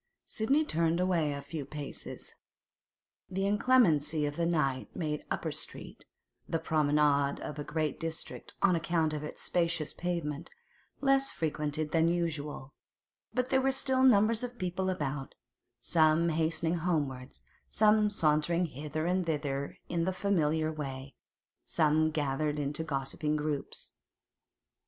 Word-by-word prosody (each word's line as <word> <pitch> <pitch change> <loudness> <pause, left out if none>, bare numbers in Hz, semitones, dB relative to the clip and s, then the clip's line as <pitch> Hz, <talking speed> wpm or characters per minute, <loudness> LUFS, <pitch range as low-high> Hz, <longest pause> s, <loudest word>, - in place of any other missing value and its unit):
Sidney 275 +8 +1
turned 165 - +1
away 175 -5 +2
a 140 0 -5
few 145 +1 -5
paces. 145 0 -7 1.0
The 195 +1 -1
inclemency 195 - +3
of 145 0 -3
the 170 +1 0
night 140 -6 0
made 150 -3 -2
Upper - - -2
Street—the 165 - -7
promenade 150 -3 +2
of 150 - -6
a - - -2
great 155 -1 -2
district 165 0 -5
on 185 -3 +5
account 165 -1 +1
of 150 -1 -3
its 150 - -6
spacious 170 -3 0
pavement—less 180 - -2
frequented 150 -1 -2
than 165 0 +3
usual; 150 -5 -2 0.6
but 250 0 -1
there 265 -1 +3
were 270 +1 +2
still 265 -1 +1
numbers 230 -2 +5
of 245 0 -5
people 185 -1 -1
about, 145 -6 -3 0.4
some 160 0 +3
hastening 160 +1 +1
homewards, 145 -6 -2 0.3
some 215 0 +4
sauntering 165 -1 +2
hither 155 +1 -4
and 180 0 0
thither 140 -3 -2
in 170 -1 0
the 190 - +1
familiar 160 -5 +1
way, 135 -3 -6 0.5
some 155 0 +3
gathered 150 0 -1
into 145 +2 -2
gossiping 150 +1 -2
groups. 150 -2 -4
160 Hz, 130 wpm, -31 LUFS, 150-180 Hz, 1.0 s, on